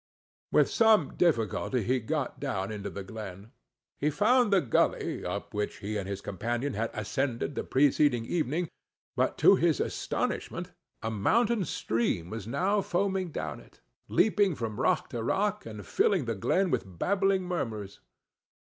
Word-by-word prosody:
With - - +5
some 220 -3 +4
difficulty 125 - +1
he 130 +4 +1
got 135 +3 -3
down 100 -9 -2
into 105 -2 -4
the 100 - -6
glen: 100 0 -8 0.5
he 150 - +2
found 220 - +3
the 195 - +6
gully 130 -9 0
up 95 +3 -4
which 105 0 -2
he 105 +2 -4
and 100 -2 -3
his 100 0 -4
companion 120 +8 -2
had 115 +3 -1
ascended 120 +5 -2
the - - -3
preceding 135 -3 +3
evening; 165 +3 -1 0.5
but - - +1
to - - +6
his - - +2
astonishment - - -2 0.3
a 110 - -1
mountain 215 - +2
stream 110 - -1
was 110 -2 -5
now 190 - +1
foaming 190 0 0
down - - -4
it, - - -19 0.3
leaping 205 -3 +3
from 115 -4 -4
rock - - +2
to 120 - -4
rock, 205 - 0
and 105 -2 -8
filling 185 -10 +2
the 115 - -1
glen 180 - +1
with 95 -3 -2
babbling 195 - +2
murmurs. 110 - -4
130 Hz, 155 wpm, -29 LUFS, -, 0.5 s, the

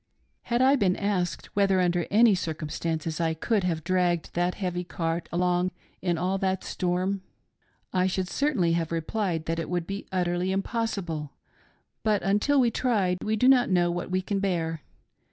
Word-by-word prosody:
Had 240 +1 +2
I 270 +2 +6
been 190 -5 +2
asked 200 -4 -2
whether 195 -2 +3
under 175 -2 +1
any 220 +1 +6
circumstances 160 -1 -3
I 160 -1 +1
could 205 +5 0
have 165 -3 -1
dragged 175 -2 0
that 175 +1 0
heavy 180 -2 -2
cart 165 -1 -3
along 180 +1 +1 0.3
in 175 -2 0
all 185 +3 0
that 190 -1 0
storm, 185 +2 -1 0.7
I 185 0 +3
should 185 0 -1
certainly 240 - +1
have 165 -1 -1
replied 165 0 -1
that 165 0 -1
it 165 - -4
would 175 -1 -1
be 195 +3 -6
utterly 180 0 0
impossible; 190 - -2 0.7
but 210 -2 +1
until 210 +9 +2
we 245 -2 +4
are - - -8
tried 200 -9 +1
we 215 0 0
do 250 +4 +3
not 255 -2 +5
know 175 -2 +3
what 175 +1 -4
we 185 0 0
can 200 +1 -1
bear. 165 -5 -1
180 Hz, 170 wpm, -27 LUFS, 170-200 Hz, 0.7 s, I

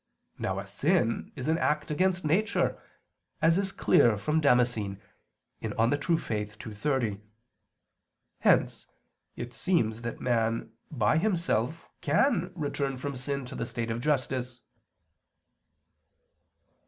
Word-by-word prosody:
Now 95 0 -1
a 100 - -4
sin 120 - 0
is 130 0 -5
an 160 +1 +2
act 150 0 0
against 185 +2 +1
nature, 185 +9 +1 0.6
as 165 +3 +4
is 195 -1 -1
clear 115 - +4
from 150 +10 0
Damascene 120 -7 +2 0.6
(De - - -3
Fide 115 +4 +2
Orth. 160 +1 0 0.4
ii, 110 - -6
30). 110 -3 -1 1.2
Hence - - +2 0.5
it 120 +1 -6
seems 115 -9 0
that 120 0 -5
man 115 -2 0 0.2
by 125 +2 +2
himself 165 - 0
can 175 - +2
return 140 -4 -2
from 140 +2 -4
sin 140 +1 -3
to 125 - -9
the 115 - -3
state 115 -1 -3
of 115 +1 -3
justice. 130 -3 -1
135 Hz, 120 wpm, -29 LUFS, 115-160 Hz, 1.2 s, as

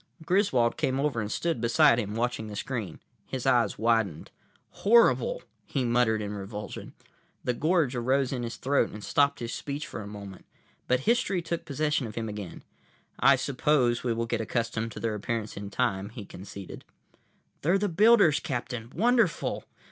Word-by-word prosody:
Griswold 165 - +2
came 130 0 0
over 140 -5 0
and 105 0 -4
stood 165 -9 -1
beside 115 0 +5
him, 105 -2 -3
watching 115 -1 -1
the 105 - -7
screen. 105 -6 -4 0.3
His - - -4
eyes - - +3
widened. 110 -7 0 0.5
"Horrible," 235 - +4 0.2
he 135 -3 -2
muttered 120 -2 +2
in 105 0 -4
revulsion. 105 +1 -7 0.5
The 125 - 0
gorge 155 -1 +1
arose 130 +2 +1
in 125 - -2
his 120 -1 -4
throat 140 +2 +1
and 105 0 -9
stopped 140 +7 +2
his 115 0 -4
speech 145 +2 -4
for 115 - -7
a 100 - -8
moment. 100 -2 -9 0.4
But 125 0 +2
history 215 - +1
took 170 0 -3
possession 150 -2 0
of 110 - -9
him 115 -1 -3
again. 105 -4 -7 0.6
"I 140 - +6
suppose 130 -2 +1
we 120 - 0
will 115 0 -1
get 115 0 -1
accustomed 115 0 -2
to - - -7
their 115 -1 -1
appearance 110 +1 -3
in 100 0 -6
time," 100 -3 -1
he 110 -2 -9
conceded. 95 +1 -9 0.8
"They're 175 +6 +3
the 205 +1 0
builders, 200 -3 +5
Captain. 120 -5 -4
Wonderful!" 225 -1 +1
120 Hz, 170 wpm, -28 LUFS, 110-150 Hz, 0.8 s, I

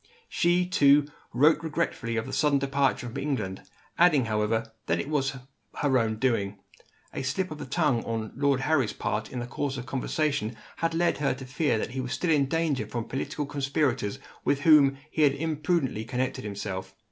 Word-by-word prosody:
She, 175 +1 +2
too, 145 -5 +5 0.3
wrote 150 +5 +4
regretfully 150 -8 -2
of 110 - -1
the 130 - -7
sudden 150 -2 +3
departure 140 -2 +1
from 115 - -6
England; 105 -10 -2 0.4
adding, 160 -7 +5
however, 110 +1 0 0.2
that - - +1
it - - -3
was 135 -3 0 0.4
her 140 -3 +2
own 110 -1 0
doing. 110 -5 0 0.6
A - - -3
slip 165 +7 -2
of 155 - -6
the - - -6
tongue, 145 -4 +1
on 110 -1 -3
Lord 140 0 +2
Harry's 135 -6 +1
part, 105 0 -3
in 130 - -5
the 120 - -3
course 135 +2 -3
of 125 - -5
conversation, 135 -3 -1 0.2
had 165 0 -1
led 170 -2 +1
her 145 - +1
to 130 - -9
fear 130 0 0
that 110 - -3
he 130 +1 -3
was 125 -1 -4
still 175 - 0
in 140 -3 +3
danger 150 -7 0
from 120 +1 -3
political 135 +3 -3
conspirators 135 -5 -1 0.3
with 140 0 +1
whom 145 -3 +6
he 155 - -1
had 145 -2 +5
imprudently 155 -6 -1
connected 125 +2 -2
himself. 100 -2 -5
135 Hz, 185 wpm, -27 LUFS, 115-150 Hz, 0.6 s, whom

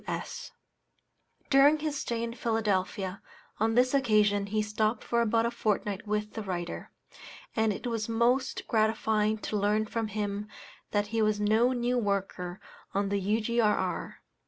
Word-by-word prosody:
W.S. - - -5 1.0
During 285 +3 +6
his 305 -1 -3
stay 235 -6 -2
in 230 0 -3
Philadelphia, 205 -5 -1 0.4
on 225 +1 +2
this 255 +2 +4
occasion, 210 -6 +3
he 215 +1 0
stopped 215 +1 0
for 235 0 +1
about 230 0 +2
a 235 - 0
fortnight 210 -2 -1
with 210 0 -2
the 220 - -4
writer, 175 -4 -4 0.7
and 220 -1 +2
it 205 - -6
was 230 -2 -2
most 240 +3 +1
gratifying 220 -1 +2
to 210 0 -3
learn 210 +2 +2
from 225 +1 -2
him 205 0 -3 0.4
that 205 0 0
he 225 - +2
was 215 -1 +2
no 220 +4 +3
new 245 0 0
worker 195 -3 -2 0.4
on 200 0 +1
the 200 0 0
U.G.R.R. 210 -1 0
215 Hz, 150 wpm, -29 LUFS, 205-235 Hz, 1.0 s, During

